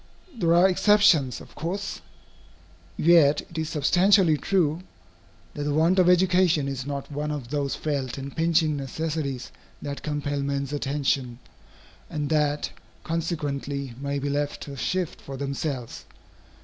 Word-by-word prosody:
There 170 -7 +2
are 175 +2 +6
exceptions, 185 - +4
of - - -14
course. 195 +5 -4 1.0
Yet 155 -3 +5
it 165 - -9
is 160 -1 -2
substantially 175 +3 +4
true, 165 -1 +1 0.7
that - - -6
the 145 0 -1
want 170 +5 +3
of 180 -1 +5
education 180 -4 +3
is 135 -1 -4
not 140 0 -5
one 150 +1 -3
of 145 -5 -5
those 140 -1 -1
felt 140 -5 -3
and 135 0 -7
pinching 160 -2 +2
necessities 140 -1 -3 0.3
that 140 -1 -6
compel 145 -1 -2
men's 140 0 -2
attention, 135 -3 -1 0.7
and 150 -2 -3
that 150 -1 +1 0.3
consequently 145 -5 -3
may 140 0 -2
be 140 +1 -3
left 145 0 -2
to 140 - -8
shift 180 +5 -2
for 135 -1 -8
themselves. 140 -2 -4
150 Hz, 135 wpm, -25 LUFS, 140-165 Hz, 1.0 s, are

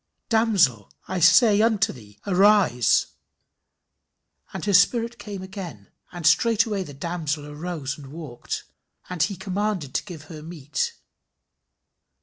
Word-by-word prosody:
"Damsel, 200 - +2 0.2
I 185 0 -2
say 205 +4 +6
unto 220 -2 +2
thee, 105 -5 -15
arise." 190 - +4 1.5
"And - - -5
her 205 - +1
spirit 230 +4 +3
came 200 -3 -7
again," 180 - -9 0.2
"and 175 -3 -7
straightway 220 +4 +3
the 145 -7 -8
damsel 155 -1 -3
arose 150 -1 -5
and 140 - -11
walked," 145 -4 -6 0.5
"and 180 -3 -3
he 190 +5 +1
commanded 190 -5 -3
to - - 0
give 170 -7 -9
her 155 -1 -10
meat." 165 - -4
180 Hz, 125 wpm, -24 LUFS, 150-205 Hz, 1.5 s, say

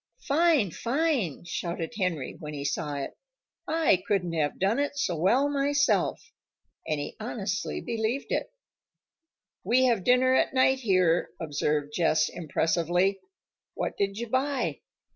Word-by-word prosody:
"Fine! 300 - +3
Fine!" 240 - -1
shouted 170 -2 -4
Henry 180 -10 -2
when 150 -1 -7
he 140 -1 -5
saw 150 0 -2
it. 140 - -5 0.5
"I 315 - +3
couldn't 180 -4 0
have 150 -3 0
done 200 +7 +1
it 285 0 -1
so 180 -10 0
well 215 - +3
myself." 285 +10 +1 0.6
And 155 -2 0
he 145 - -5
honestly 210 -3 -3
believed 235 +3 -2
it. - - -1 1.1
"We 255 +2 +3
have 230 -7 +2
dinner 250 +3 +4
at 260 - +2
night, 260 0 +4
here," 185 -7 +2
observed 150 -1 -1
Jess 155 -2 +2
impressively. 175 +4 0 0.6
"What - - -3
did 195 0 -1
you 235 - -3
buy?" 260 +2 -1
195 Hz, 135 wpm, -27 LUFS, 165-260 Hz, 1.1 s, dinner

